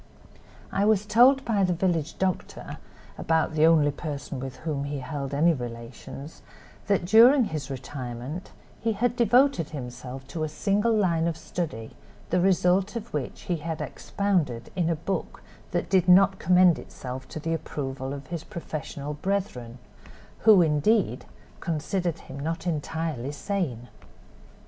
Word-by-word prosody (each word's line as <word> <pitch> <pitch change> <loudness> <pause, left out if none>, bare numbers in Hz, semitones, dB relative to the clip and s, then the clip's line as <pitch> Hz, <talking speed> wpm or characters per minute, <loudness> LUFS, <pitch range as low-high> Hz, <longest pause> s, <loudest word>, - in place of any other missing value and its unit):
I 200 - +1
was 210 -1 +3
told 250 +6 +5
by 210 -4 +2
the 180 -1 +2
village 165 -3 -1
doctor, 185 -1 -3 0.4
about 160 -1 +1
the 155 +1 +5
only 155 -3 +5
person 145 -3 -5
with 130 0 -6
whom 150 -3 -3
he 145 0 -3
held 140 0 -5
any 160 +4 +4
relations, 120 +3 -8 0.5
that 200 -3 +2
during 235 +7 +7
his 155 -8 -4
retirement 130 +3 -6 0.3
he 225 -1 0
had 235 +3 0
devoted 240 - +3
himself 125 -2 -7
to 160 - -3
a 155 - -1
single 205 +8 +1
line 175 -7 +2
of 165 -1 -2
study, 150 -14 -5 0.4
the 180 +1 +3
result 190 +2 +2
of 230 0 -6
which 145 -4 -4
he 175 - -2
had 160 0 -4
expounded 175 -13 -1
in 170 -3 +1
a 165 - +1
book 180 +5 -4 0.3
that - - -1
did 185 -2 +3
not 190 +1 +6
commend 180 -1 +5
itself 130 0 -8
to 155 - -7
the 165 +2 -2
approval 135 -4 -4
of 140 -1 -6
his 165 +2 -5
professional 150 -4 -6
brethren, 150 - -3 0.6
who, 210 -5 +7
indeed, 160 +8 +2 0.3
considered 175 +1 -2
him 135 - -9
not 165 +4 -3
entirely 155 -4 -2
sane. 145 - -3
165 Hz, 145 wpm, -26 LUFS, 140-195 Hz, 0.6 s, during